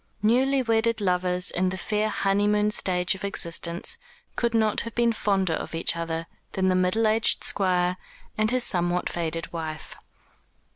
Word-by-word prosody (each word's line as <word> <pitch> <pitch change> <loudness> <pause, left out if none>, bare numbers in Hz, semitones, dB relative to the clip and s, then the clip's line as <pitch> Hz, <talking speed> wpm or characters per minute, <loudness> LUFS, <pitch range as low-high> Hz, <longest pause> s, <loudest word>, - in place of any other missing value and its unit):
Newly 260 +4 +3
wedded 230 0 +1
lovers 180 -2 0
in 185 +1 0
the 185 - -4
fair 210 +3 -1
honeymoon 210 +1 +1
stage 180 -3 +1
of 190 - -9
existence 170 -3 -1 0.4
could 235 -1 0
not 220 -2 +2
have 230 - -7
been 235 -1 +2
fonder 195 -5 0
of 160 - -4
each 165 - +1
other 165 0 -3 0.3
than 190 -1 +1
the 185 - +2
middle 185 +5 +2
aged 220 +1 +2
Squire 180 -2 +1 0.4
and 215 0 +1
his 255 +1 +2
somewhat 175 -2 +1
faded 165 -1 -2
wife. 160 -2 -6
190 Hz, 155 wpm, -25 LUFS, 180-215 Hz, 0.4 s, Newly